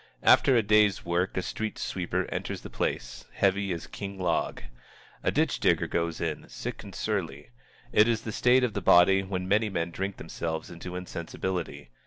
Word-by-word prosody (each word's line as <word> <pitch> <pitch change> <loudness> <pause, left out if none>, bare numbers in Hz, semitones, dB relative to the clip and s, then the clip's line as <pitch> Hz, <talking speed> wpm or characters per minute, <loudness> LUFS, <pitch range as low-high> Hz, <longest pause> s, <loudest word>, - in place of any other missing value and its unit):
After 130 -3 +6
a 115 - +3
day's 105 -2 +3
work 90 +2 0
a 95 - 0
street 110 0 -4
sweeper 90 -2 -2
enters - - -4
the - - -10
place, - - -3
heavy 100 0 +1
as 85 -2 -4
King 100 -1 -7
Log. 90 -8 -1 0.6
A - - +1
ditch - - +1
digger - - +3
goes 85 -1 -2
in, 80 -2 -3
sick - - -6
and - - -10
surly. 70 -2 -3 0.4
It 105 +1 +5
is 115 -2 0
the 110 - -4
state 125 +4 +4
of 120 -4 0
the 100 - -2
body 95 +2 +6
when 95 -1 -4
many 105 +3 +2
men 85 -3 -2
drink 95 +2 -4
themselves 80 0 -4
into 90 +1 -7
insensibility. 90 -5 -5
95 Hz, 180 wpm, -28 LUFS, 85-100 Hz, 0.6 s, After